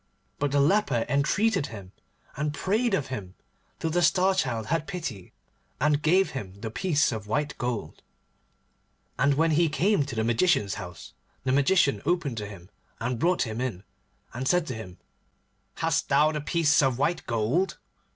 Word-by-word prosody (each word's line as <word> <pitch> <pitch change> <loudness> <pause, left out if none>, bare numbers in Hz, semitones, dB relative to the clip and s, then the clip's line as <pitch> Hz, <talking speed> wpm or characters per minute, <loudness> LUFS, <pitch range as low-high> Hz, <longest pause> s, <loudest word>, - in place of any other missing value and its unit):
But 145 - +1
the 140 +1 +2
leper 140 - +2
entreated 185 +5 +1
him, 100 -5 -10 0.4
and 150 +1 -2
prayed 215 +5 +1
of 145 -7 -3
him, 95 -6 -6 0.4
till 160 - -2
the 175 +2 +2
Star 185 +3 +4
Child 120 -11 -1
had 160 +4 -1
pity, 150 - -6 0.5
and 150 +1 +2
gave 185 +5 +3
him 100 -7 -7
the 110 -1 -4
piece 150 +5 +1
of 110 -3 -5
white 145 +7 -1
gold. 120 -10 -4 1.2
And 140 +1 +3
when 160 +3 +2
he 165 +1 +3
came 180 +2 +2
to 125 - -6
the 110 - 0
Magician's 115 - +2
house, 90 -7 -10 0.3
the 130 - 0
Magician 140 +2 +3
opened 165 -9 0
to 105 -1 -4
him, 95 -2 -12 0.3
and 120 +1 -2
brought 180 +5 +2
him 115 0 -4
in, 115 -8 -3 0.5
and 130 +2 -3
said 180 +1 +3
to 130 - -4
him, 100 -6 -9 0.8
'Hast - - 0
thou 155 +1 +4
the 150 -1 -3
piece 150 -1 +3
of 130 -3 +1
white 160 +5 -1
gold? 120 - 0
140 Hz, 170 wpm, -27 LUFS, 115-165 Hz, 1.2 s, Star